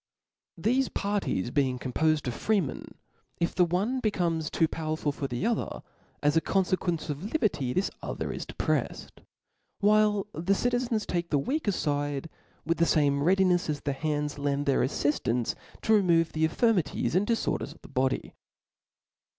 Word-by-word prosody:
Theft 250 +8 +1
parties 200 - -1
being 130 -3 +1
compoled 150 +4 0
of 125 - -1
freemen, 195 - -1 0.4
if 170 - 0
the 180 - +4
one 200 +10 0
becomes 170 -8 0
too 165 - +2
powerful 155 -2 -2
for 140 -1 -4
the 120 - -3
Other, 235 0 -1 0.4
as 145 +1 +3
a 165 - +4
con 195 +3 +2
iequence 175 -4 -1
of 170 +10 -6
liberty, 195 - 0
this 185 +9 0
other - - -4
is - - -6
depre(&d; - - -2 0.7
while 210 -1 +3
the 175 +5 +1
citizens 245 -1 0
take^ 175 -1 -2
the 145 - +2
weaker 255 - 0
fide, 145 -2 -2 0.3
with 165 +1 0
the 170 - +5
(zmt 145 -4 +2
readinefs 180 +1 +3
as 145 -1 -2
the 140 - -1
hands 150 0 -2
lend 145 0 0
their 140 -2 +2
afiiftance 125 -3 0 0.3
to 220 - +3
remove 170 -5 +4
the 160 0 +2
infirmities 190 0 +1
and 190 +4 +2
diforders 230 -1 -1
of - - -23
the - - -11
body. 130 -1 -1
165 Hz, 160 wpm, -28 LUFS, 145-200 Hz, 0.7 s, the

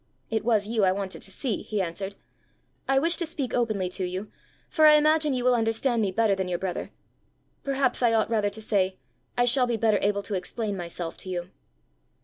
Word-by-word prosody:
"It 220 -1 0
was 215 -3 +2
you 220 -2 +1
I 185 - +5
wanted 195 0 -4
to - - -9
see," 210 +3 -3
he 215 - -3
answered. 190 +2 -3 0.7
"I 270 - +3
wish 330 +5 +3
to 345 - -1
speak 270 -6 -4
openly 215 -6 0
to 185 - -4
you, 185 +3 -4 0.4
for 310 -2 +5
I 300 - +8
imagine 305 -1 +3
you 250 - -1
will 250 0 +4
understand 230 +1 +1
me 205 - +1
better 215 +2 +2
than 190 -1 -2
your 180 -1 -1
brother. 185 0 -4 0.7
Perhaps 275 -2 0
I 240 -2 +4
ought 225 0 +1
rather 210 -2 +2
to 210 +2 -9
say 190 -3 +1 0.4
I 245 - +4
shall 250 +1 +3
be 235 -1 0
better 220 -2 +2
able 200 0 +1
to 200 - -4
explain 205 +2 -2
myself 170 -2 -5
to 185 - -7
you." 180 0 -4
215 Hz, 210 wpm, -26 LUFS, 190-245 Hz, 0.7 s, I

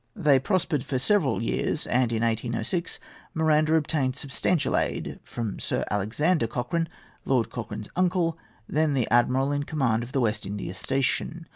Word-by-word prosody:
They 150 -9 +4
prospered 165 -2 0
for 135 -1 -2
several 140 - +2
years; - - -1
and 125 -1 +1
in 115 0 0
1806 115 - -1 0.4
Miranda 155 0 +3
obtained 145 -4 +1
substantial 145 +3 0
aid - - -1
from 115 -4 -4
Sir - - -1
Alexander 115 - +1
Cochrane, 125 +8 -2 0.3
Lord 125 -4 +1
Cochrane's 110 -2 -6
uncle, 175 -2 +2 0.3
then 155 -1 +1
the 125 -4 +1
admiral 125 +4 +3
in 145 0 0
command 135 -7 0
of 120 +2 -7
the 135 - +1
West 105 -2 0
India 100 -2 -4
station. 135 - -1
135 Hz, 150 wpm, -26 LUFS, 115-160 Hz, 0.4 s, They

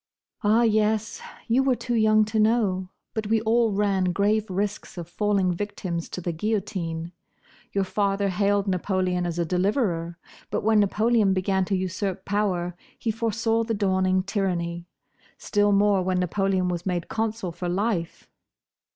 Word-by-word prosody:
"Ah, 220 +3 +4
yes! 220 0 +1 0.3
You 240 +3 +3
were 265 -1 +2
too 240 +1 -4
young 215 -1 +4
to 220 +1 -1
know; 210 -5 +2 0.2
but 220 -2 -3
we 220 +1 +3
all 225 0 +2
ran 200 -2 +1
grave 205 +4 +1
risks 200 +1 -3
of 170 -2 -6
falling 195 0 +1
victims 180 -3 -4
to 180 - -6
the 175 - -2
guillotine. 170 -3 -3 0.6
Your 195 - +1
father 200 +1 0
hailed 200 +1 +1
Napoleon 185 -1 0
as 170 -1 -4
a 170 - +1
deliverer; 180 - 0 0.3
but - - -2
when 220 0 +4
Napoleon 210 0 +3
began 190 0 +1
to 195 +1 0
usurp 190 +1 -3
power, 185 -4 -1 0.2
he 225 - -1
foresaw 225 +1 0
the 225 0 -2
dawning 190 -2 +1
tyranny; 175 -3 -2 0.5
still 205 -1 +1
more 200 -1 +3
when 185 0 0
Napoleon 185 0 0
was 175 -1 -2
made 180 -2 -2
consul 220 -4 -2
for 175 +1 -4
life. 185 -2 -2
200 Hz, 150 wpm, -25 LUFS, 180-215 Hz, 0.6 s, Ah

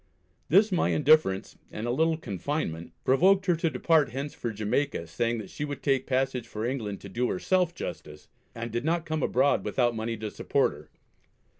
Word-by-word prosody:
This 200 +7 +5
my 180 - +2
indifference, 145 -10 +3
and 110 - -5
a 120 - 0
little 160 +5 +2
confinement, 100 - -4
provoked 185 +8 +4
her 175 -3 +3
to 165 0 +1
depart 160 -2 +2
hence 135 +4 -5
for 120 - -4
Jamaica, 110 0 -1
saying 115 +8 -1
that 105 -4 -7
she 150 - -5
would 145 -1 -5
take 135 -2 +1
passage 130 -2 0
for 110 0 -4
England 115 -6 -3
to - - -9
do 120 +6 -1
herself 185 -1 +1
justice, 75 - -7 0.3
and 115 0 -5
did 120 +2 -2
not 165 +2 0
come 155 -2 -2
abroad 135 +2 +2
without 120 -2 +1
money 115 +1 -3
to 105 0 -5
support - - +1
her. - - -13
130 Hz, 185 wpm, -28 LUFS, 110-155 Hz, 0.3 s, This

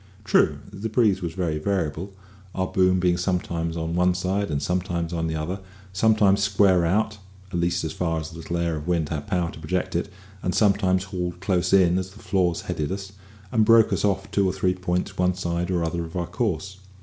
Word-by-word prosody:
True, - - +3 0.2
the 105 +3 -4
breeze 105 -4 +2
was 85 -2 -4
very 85 -5 -1
variable, 90 0 -2 0.4
our 95 - 0
boom 95 0 +2
being 90 -1 +2
sometimes 85 -2 -1
on 80 0 -2
one 90 +1 +3
side 95 +2 -1
and 70 -2 -1
sometimes 90 0 -2
on 80 -1 -1
the 80 - -2
other, 85 +5 -3 0.3
sometimes 100 0 +4
square 95 -4 +4
out 105 +3 0 0.3
(at 90 - 0
least 90 +1 0
as 80 - -3
far 80 -2 -1
as 80 0 -6
the 80 - -10
little 85 +1 -4
air 85 -1 0
of 75 +2 -7
wind 85 -4 0
had 75 0 -4
power 90 -4 0
to - - -11
project - - -2
it), - - -1 0.3
and 90 - -1
sometimes 95 -3 +3
hauled 90 -2 -4
close 95 -1 0
in 95 -2 +5
as 95 0 -4
the 100 - -16
flaws 90 -6 0
headed 75 +1 -3
us, 95 0 -5 0.4
and 110 -2 +3
broke 115 0 +5
us - - 0
off 95 -1 0
two 100 -2 +2
or - - -2
three 95 -1 +1
points 90 -1 -2
one 90 0 +2
side 85 -1 -2
or 90 -2 +1
the - - 0
other 85 +1 -2
of 80 - -11
our 90 -1 -1
course. 95 +3 -2
90 Hz, 220 wpm, -24 LUFS, 85-95 Hz, 0.4 s, in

